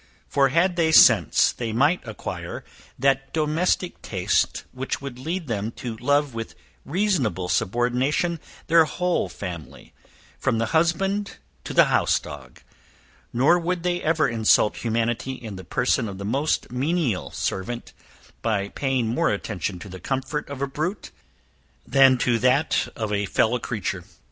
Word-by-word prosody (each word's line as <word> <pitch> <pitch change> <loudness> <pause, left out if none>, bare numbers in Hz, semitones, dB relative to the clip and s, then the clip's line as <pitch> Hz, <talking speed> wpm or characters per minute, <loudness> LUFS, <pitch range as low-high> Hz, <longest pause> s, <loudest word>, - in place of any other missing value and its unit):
For 135 -1 +3
had 175 +5 +2
they 160 -2 +3
sense, - - +6
they 115 -2 -4
might 145 +10 +3
acquire 110 - -6 0.3
that 135 +1 +1
domestic 165 +3 0
taste 95 -3 0
which 130 +1 -4
would 135 -3 -8
lead 165 +6 -3
them 110 -4 -2
to 120 -3 -6
love 145 +2 +1
with 115 -1 -6 0.3
reasonable 145 - 0
subordination 125 - 0 0.3
their 165 0 +5
whole 180 - -1
family, 85 -6 -8 0.5
from - - +1
the 115 0 -2
husband 195 +5 +1 0.3
to - - -5
the - - +7
house - - +3
dog; 65 -3 -11 0.7
nor 145 +9 +4
would 175 0 -2
they 175 0 0
ever 160 0 +2
insult 110 -2 +3
humanity 115 +2 -1
in 110 -5 -8
the 95 - -8
person 125 +3 0
of 95 - -7
the 100 - -6
most 135 +7 0
menial 135 - -1
servant, 120 +6 -4 0.5
by 100 -3 -1
paying 130 -1 -1
more 115 +2 +1
attention 100 -2 -3
to 90 - -10
the 95 -1 -9
comfort 135 - -3
of 140 -1 -4
a - - 0
brute, 155 +9 -4 0.7
than 135 -1 +5
to 120 -1 +1
that 130 +5 +2
of 110 -2 -3
a 100 0 0
fellow 115 +6 +2
creature. 95 -6 -3
130 Hz, 150 wpm, -24 LUFS, 110-155 Hz, 0.7 s, the